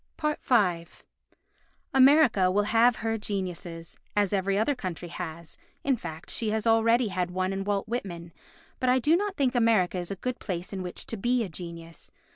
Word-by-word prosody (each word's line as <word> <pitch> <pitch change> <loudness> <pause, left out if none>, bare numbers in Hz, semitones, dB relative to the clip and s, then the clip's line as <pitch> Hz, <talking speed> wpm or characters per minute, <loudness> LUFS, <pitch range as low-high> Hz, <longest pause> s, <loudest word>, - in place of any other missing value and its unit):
v 220 - +1 1.1
America 265 -8 +5
will 205 +3 +2
have 230 +3 +4
her 225 0 -2
geniuses, 180 -5 -5 0.2
as 205 -1 +2
every 195 0 +1
other 220 +7 +2
country 180 - -6
has, 170 - -7 0.2
in 275 -1 +2
fact 160 -8 -8
she 225 - -2
has 220 +1 -1
already 230 +1 +3
had 180 -1 -1
one 185 +1 -1
in 195 0 -3
Walt 200 +1 -1
Whitman, 175 -8 -5 0.5
but 255 - +1
I 255 - +5
do 295 +6 +3
not 405 +1 -1
think 265 -3 +2
America 225 -7 +2
is 175 - -5
a 195 - -3
good 250 +6 -4
place 180 0 -5
in 190 - -4
which 180 -1 -6
to 225 - -5
be 240 +4 +1
a 200 - -5
genius. 165 0 -9
200 Hz, 180 wpm, -27 LUFS, 180-240 Hz, 1.1 s, America